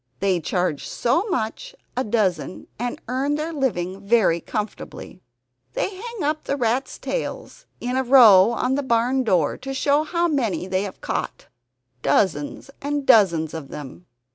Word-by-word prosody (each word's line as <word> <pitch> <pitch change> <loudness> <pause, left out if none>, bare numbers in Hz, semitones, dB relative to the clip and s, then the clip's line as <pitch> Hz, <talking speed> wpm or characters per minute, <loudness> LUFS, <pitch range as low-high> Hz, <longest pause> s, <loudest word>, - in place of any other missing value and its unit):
They 190 -3 +1
charge 175 -2 -1
so 330 - 0
much 340 - -3 0.2
a 255 - 0
dozen 195 - -1
and 245 0 -3
earn 270 +4 0
their 310 +2 -3
living 195 - -2
very 200 -6 +3
comfortably. 210 -2 -6 0.5
They 395 - -2
hang 460 -1 -6
up 305 +1 -1
the 280 - -1
rats' 245 +1 -1
tails - - -5
in 250 +1 -3
a 265 - +1
row 230 -7 +7
on 250 +2 0
the 285 - +1
barn 255 +1 +1
door, 180 -10 +1
to 270 0 -6
show 285 +2 +2
how 340 +2 0
many 255 - -1
they 185 0 -1
have 195 - -9
caught - - -4 0.5
dozens 145 - 0
and 285 0 -2
dozens 170 - +4
of 160 -4 -6
them. 150 +5 -9
235 Hz, 155 wpm, -23 LUFS, 185-280 Hz, 0.5 s, row